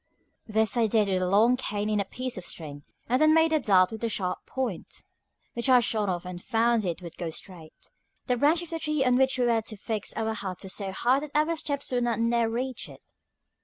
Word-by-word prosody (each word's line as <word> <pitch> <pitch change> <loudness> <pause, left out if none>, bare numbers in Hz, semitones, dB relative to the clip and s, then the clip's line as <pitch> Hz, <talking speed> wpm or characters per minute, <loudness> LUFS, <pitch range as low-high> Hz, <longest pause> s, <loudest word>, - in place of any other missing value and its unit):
This 220 +2 +2
I 230 -2 +3
did 215 -1 +2
with 185 -1 0
a 180 - 0
long 220 +6 +4
cane 210 -4 -3
and 210 -1 +1
a - - -3
piece 255 +5 -4
of 185 - -6
string, 145 -4 -6 0.3
and 255 +4 +1
then 310 0 +6
made 320 0 +4
a 310 - +4
dart 190 -7 +4
with 220 +1 -7
a 230 - +1
sharp 185 -4 -2
point, 250 -9 -5 0.5
which 235 +3 -1
I 255 -1 +7
shot 215 -3 0
off 175 -1 -3
and 180 -1 -7
found 230 0 +1
it 175 0 -3
would 170 -1 -9
go 170 - -3
straight. 160 -1 -10 0.3
The 250 - +1
branch 300 +7 +3
of 340 - -10
the 330 - -3
tree 305 -3 0
on 250 -1 +3
which 265 +1 +3
we 250 - +2
were 230 -2 +2
to 215 -1 -7
fix 215 0 -3
our 220 0 -1
hut 190 -4 -5
was 190 - -5
so 195 -2 -3
high 245 +7 +2
that 295 0 -9
our 310 +2 +2
steps 285 -3 -3
would 245 -1 +1
not 235 -2 0
near 230 0 +2
reach 250 +2 -4
it. - - -14
225 Hz, 240 wpm, -27 LUFS, 195-255 Hz, 0.5 s, I